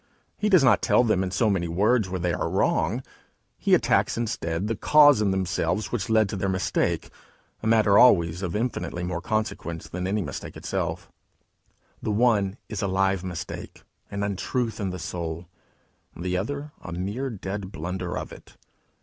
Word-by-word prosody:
He 210 - 0
does 185 -7 +6
not 130 - +5
tell - - +4
them 110 -6 +2
in 95 - -1
so 95 +5 +1
many 95 -4 +1
words 100 +5 +2
where 95 0 -3
they 85 0 0
are - - -1
wrong; 110 +11 +1 0.6
he - - +4
attacks - - +2
instead 95 -7 -2
the 115 - -1
cause 145 0 +6
in 105 - +2
themselves 95 +2 -1
which 115 -1 -2
led 110 -1 +4
to - - -3
their 95 0 -1
mistake 95 -1 -1 0.5
a 110 - -3
matter 110 -2 +5
always 85 -8 +5
of 90 -2 -3
infinitely 105 -6 -2
more 90 -1 -3
consequence 90 -5 -3
than 90 +3 -4
any 100 +1 0
mistake - - -7
itself: - - -3 0.9
the - - -3
one 105 -3 +2
is 105 -3 -4
a 100 - 0
live 95 -1 +1
mistake, 90 -3 -7 0.3
an 100 0 -3
untruth 110 +4 -2
in 100 -2 -1
the 90 - -5
soul, 85 -1 -5 0.7
the 90 +1 -2
other 140 +10 -3
a - - -8
mere 100 +10 -3
dead 100 -3 -5
blunder 90 +2 -4
born - - -3
of - - -9
it. - - -14
100 Hz, 175 wpm, -25 LUFS, 90-110 Hz, 0.9 s, does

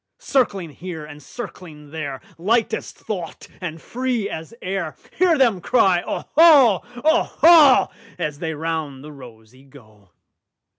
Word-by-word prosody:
Circling 200 - -1
here 165 -1 -8
and 150 0 -12
circling 160 - -10
there, 145 -4 -6 0.2
Light 225 +6 +1
as - - -4
thought 180 -6 -7
and 165 -3 -6
free 245 0 -3
as 160 +4 -7
air, 185 -4 -4 0.2
Hear 355 -3 +4
them 235 -9 +2
cry, 195 -6 +2
"Oho, 280 - +4 0.2
oho,"As 300 - +3
they 160 -1 -4
round 155 -4 -4
the 150 - -10
rosey 125 -2 -15
go. 110 -8 -19
170 Hz, 120 wpm, -21 LUFS, 150-240 Hz, 0.2 s, Hear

